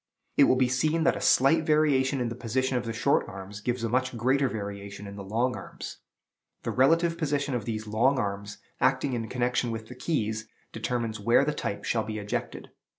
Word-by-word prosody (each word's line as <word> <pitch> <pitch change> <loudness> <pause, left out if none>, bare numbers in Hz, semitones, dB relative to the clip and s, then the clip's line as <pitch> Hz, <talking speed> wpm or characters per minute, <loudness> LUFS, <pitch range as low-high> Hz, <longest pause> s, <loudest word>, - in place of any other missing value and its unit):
It - - +7
will - - +4
be 130 0 +3
seen 155 +6 +1
that - - +3
a - - -5
slight 155 +5 +4
variation 145 -3 +3
in 120 -1 0
the 115 - -5
position 130 +2 -1
of 120 -1 -1
the 115 - -2
short 115 +5 +1
arms 95 +2 -8
gives 120 +1 -2
a - - +1
much 130 +1 0
greater 130 +3 +2
variation 100 -2 -6
in 100 0 -8
the 100 - -7
long 115 +6 0
arms. - - -8 0.7
The - - -2
relative 165 +6 +3
position 145 -3 0
of 120 -4 -2
these 110 -1 -3
long 115 +6 +2
arms, 100 -2 -3 0.2
acting 135 - +2
in 115 -2 -3
connection 125 -1 0
with 115 -1 -5
the 125 - -8
keys, 110 -6 -2 0.2
determines 115 -1 -2
where 115 +6 +4
the 150 - 0
type 100 - -4
shall 115 -2 +1
be 110 0 -5
ejected. 105 0 -4
120 Hz, 205 wpm, -28 LUFS, 110-135 Hz, 0.7 s, It